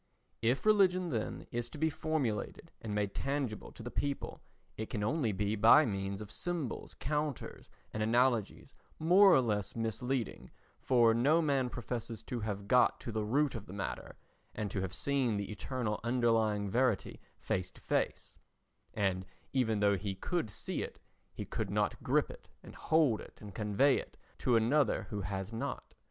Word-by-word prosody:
If 120 - +1
religion, 185 -5 +4
then, 110 -4 -3
is 120 0 -2
to 150 - -10
be 160 +1 +1
formulated 145 -9 -2
and 105 -2 -4
made 105 -1 -1
tangible 135 -6 -2
to - - -10
the 120 - -6
people, 140 -1 -3 0.3
it 110 - -5
can 105 -3 -2
only 120 0 +1
be 105 +2 -1
by 115 +8 +7
means 100 -2 -3
of 105 - -8
symbols, 170 -8 -4
counters 150 -1 -3 0.2
and 110 - -2
analogies, 120 0 +1 0.2
more 185 +5 +6
or 135 - +6
less 105 -4 -1
misleading, 115 +1 -2 0.3
for 120 -3 +4
no 140 +8 +4
man 140 -5 +1
professes 115 -2 -5
to 120 - -4
have 100 -2 -4
got 125 +3 +4
to 115 - -5
the 110 -1 -1
root 140 +7 +1
of 110 -3 -7
the 90 - -9
matter 100 - -5 0.4
and 105 -3 -3
to 95 - -2
have 95 -2 -3
seen 125 +1 0
the 100 +1 -4
eternal 105 +1 -3
underlying 115 -4 +2
verity 120 -3 0 0.2
face 90 0 -2
to - - -18
face—and 95 -3 -3 0.3
even 110 -6 +1
though 100 -1 +4
he 100 +1 -3
could 165 - -2
see - - -4
it - - -6 0.3
he - - -6
could - - -3
not - - 0
grip - - +1
it - - -14
and - - -11
hold 155 -9 +2
it - - -13
and 105 -2 -10
convey 110 +7 +3
it - - -10 0.2
to 125 - +2
another 120 +3 +3
who 105 -1 -2
has 95 +3 -4
not. 115 - -4
115 Hz, 170 wpm, -33 LUFS, 105-135 Hz, 0.4 s, by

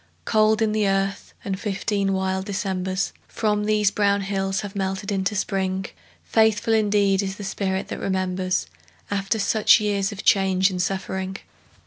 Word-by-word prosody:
Cold 215 0 +3
in 215 - +1
the 215 -1 +1
earth, 195 0 -1
and 190 -1 -2
fifteen 200 -1 -1
wild 190 0 -1
Decembers 190 -2 -2
From 210 -1 0
these 210 -1 +2
brown 200 -1 +2
hills 195 -1 -1
have 205 0 -7
melted 195 +1 -2
into 195 +1 0
Spring. 190 -1 -1 0.4
Faithful 220 0 +2
indeed 205 -2 +3
is 190 -1 -3
the 205 - -8
spirit 190 -1 -2
that - - -5
remembers 185 -1 -1 0.5
After 200 +2 0
such 215 +2 +4
years 205 -1 0
of 205 - -7
change 190 -1 +3
and 180 -1 -2
suffering! 190 0 -3
195 Hz, 150 wpm, -23 LUFS, 190-210 Hz, 0.5 s, such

